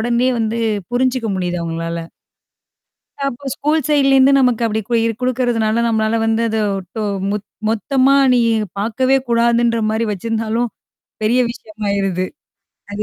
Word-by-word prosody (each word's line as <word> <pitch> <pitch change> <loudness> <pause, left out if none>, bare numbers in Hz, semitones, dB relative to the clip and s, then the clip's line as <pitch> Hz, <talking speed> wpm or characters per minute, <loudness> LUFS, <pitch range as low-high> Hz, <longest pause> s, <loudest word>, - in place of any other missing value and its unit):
உடனே 240 +2 +1
வந்து 225 +1 -1 0.3
புரிஞ்சுக்க 250 -1 0
முடியுது 180 -1 -2
அவுங்களால. 165 0 -4 1.2
அப்போ 275 +1 -5
ஸ்கூல் 305 +2 0
சைட்ல 275 -2 +3
இருந்து 270 +1 +6
நமக்கு 250 -3 +2
அப்பிடி 220 -1 0
கு 240 - 0 0.3
குடுக்குறதுனால 235 -3 0
நம்மளால 220 0 +1
வந்து 225 +1 +1
அத 220 0 -1 0.4
டோ 220 - -1 0.3
மொத் 210 0 -3 0.2
மொத்தமா 260 +5 +2 0.2
நீ 245 - +3 0.4
பார்க்கவே 255 +6 +1
கூடாதுன்றமாரி 230 -1 +2
வச்சிருந்தாலும் 225 +3 -2 0.5
பெரிய 225 +4 +2
விஷயமாயிருது. 200 -5 -2 0.7
அது 205 +1 -3
230 Hz, 120 wpm, -18 LUFS, 215-250 Hz, 1.2 s, இருந்து